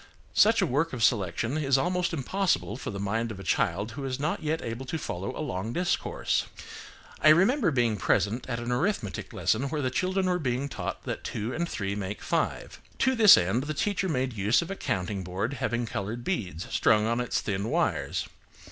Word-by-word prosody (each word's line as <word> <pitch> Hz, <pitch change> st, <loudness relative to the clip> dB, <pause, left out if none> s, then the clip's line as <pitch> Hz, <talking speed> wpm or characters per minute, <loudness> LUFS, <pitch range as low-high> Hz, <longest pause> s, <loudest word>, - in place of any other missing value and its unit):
Such 220 Hz, 0 st, +5 dB
a -, -, +4 dB
work 150 Hz, +2 st, 0 dB
of 120 Hz, -3 st, -2 dB
selection 110 Hz, -, +1 dB
is 135 Hz, -3 st, +3 dB
almost 180 Hz, +4 st, 0 dB
impossible 165 Hz, -, 0 dB
for 130 Hz, -, -6 dB
the 100 Hz, -, -5 dB
mind 110 Hz, +4 st, -1 dB
of 105 Hz, -3 st, -7 dB
a -, -, -8 dB
child 105 Hz, -, 0 dB
who 135 Hz, +5 st, -6 dB
is 130 Hz, 0 st, -3 dB
not 150 Hz, +3 st, -1 dB
yet 155 Hz, +1 st, -1 dB
able 115 Hz, +3 st, -5 dB
to 160 Hz, -, -2 dB
follow 95 Hz, -, -4 dB
a 155 Hz, -, -3 dB
long 100 Hz, +1 st, -3 dB
discourse. 180 Hz, 0 st, 0 dB, 0.7 s
I 155 Hz, -, +7 dB
remember 195 Hz, -, +5 dB
being 120 Hz, -6 st, +1 dB
present 105 Hz, +7 st, 0 dB
at 120 Hz, -, -1 dB
an 120 Hz, +1 st, -3 dB
arithmetic 125 Hz, -, -1 dB
lesson 130 Hz, +6 st, 0 dB
where 150 Hz, 0 st, -2 dB
the 130 Hz, -, 0 dB
children 185 Hz, +6 st, 0 dB
were 180 Hz, -1 st, +1 dB
being 130 Hz, -1 st, -1 dB
taught 120 Hz, -, -5 dB
that -, -, -4 dB
two 110 Hz, +4 st, -3 dB
and 170 Hz, +1 st, -2 dB
three 100 Hz, -2 st, -2 dB
make 100 Hz, 0 st, -5 dB
five. -, -, -2 dB, 0.2 s
To 260 Hz, -, +3 dB
this 220 Hz, -5 st, +9 dB
end, 95 Hz, +10 st, +1 dB
the 155 Hz, 0 st, -3 dB
teacher 200 Hz, +2 st, 0 dB
made 130 Hz, -4 st, -1 dB
use 105 Hz, -, +2 dB
of 170 Hz, -, -7 dB
a -, -, -3 dB
counting 100 Hz, -, -2 dB
board 95 Hz, +8 st, -2 dB
having 120 Hz, +2 st, 0 dB
coloured 115 Hz, +1 st, -4 dB
beads 95 Hz, -, -3 dB
strung 105 Hz, -1 st, +3 dB
on 115 Hz, +2 st, +1 dB
its 125 Hz, -, -1 dB
thin 100 Hz, +1 st, -2 dB
wires. -, -, 0 dB
125 Hz, 200 wpm, -28 LUFS, 105-160 Hz, 0.7 s, this